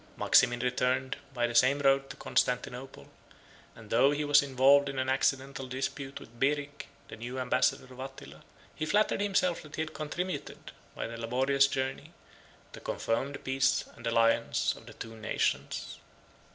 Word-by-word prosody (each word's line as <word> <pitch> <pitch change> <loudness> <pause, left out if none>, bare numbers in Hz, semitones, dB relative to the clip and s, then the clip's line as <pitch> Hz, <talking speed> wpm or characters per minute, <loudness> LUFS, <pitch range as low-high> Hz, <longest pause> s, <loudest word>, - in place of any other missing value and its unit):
Maximin 120 -2 +4
returned, 125 +1 0 0.2
by 120 -3 0
the 120 - -3
same 130 +4 +5
road, 135 -1 +2
to - - -8
Constantinople; 125 +1 -2 0.7
and 110 -2 -14
though 125 +4 +5
he 145 +1 -1
was 145 0 +6
involved 140 +1 +4
in 135 - -6
an 130 0 0
accidental 135 0 0
dispute 135 +1 -4
with 115 +1 -15
Beric, 145 +1 -1 0.2
the - - -7
new 120 +3 -6
ambassador 130 - +1
of 125 - -14
Attila, 135 0 -9 0.3
he 155 - -4
flattered 205 +3 +2
himself 190 -4 +1
that 150 - -11
he 160 - -1
had 155 - -8
contributed, 155 +1 -5 0.2
by - - -4
the 115 0 -6
laborious 135 +4 +2
journey, 135 -1 -3 0.6
to - - -9
confirm 130 +5 -2
the 140 - -6
peace 135 0 +1
and - - -7
alliance 115 0 +2
of - - -15
the - - -10
two 115 0 -8
nations. 110 0 -2
135 Hz, 165 wpm, -30 LUFS, 125-140 Hz, 0.7 s, was